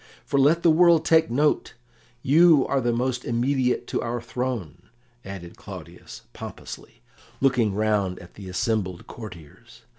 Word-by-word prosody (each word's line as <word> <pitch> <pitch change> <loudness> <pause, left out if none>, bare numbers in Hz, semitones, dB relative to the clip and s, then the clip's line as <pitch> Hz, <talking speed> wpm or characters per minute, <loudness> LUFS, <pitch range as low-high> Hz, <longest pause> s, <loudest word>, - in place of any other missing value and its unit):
"For 140 - 0
let 155 +5 +4
the 165 - +6
world 165 0 +5
take 160 -4 +4
note, 145 +5 +1 0.5
you 155 0 +5
are 135 -1 0
the 120 0 +1
most 125 +1 -1
immediate 125 +2 0
to - - -1
our 120 +1 -3
throne," 115 - -5 0.3
added 95 -3 -9
Claudius - - -11
pompously, - - -10 0.4
looking 125 -7 +2
round 105 -3 0
at 90 -1 -13
the 95 -2 -10
assembled 95 -2 -2
courtiers. 110 +3 -12
120 Hz, 140 wpm, -24 LUFS, 100-135 Hz, 0.5 s, the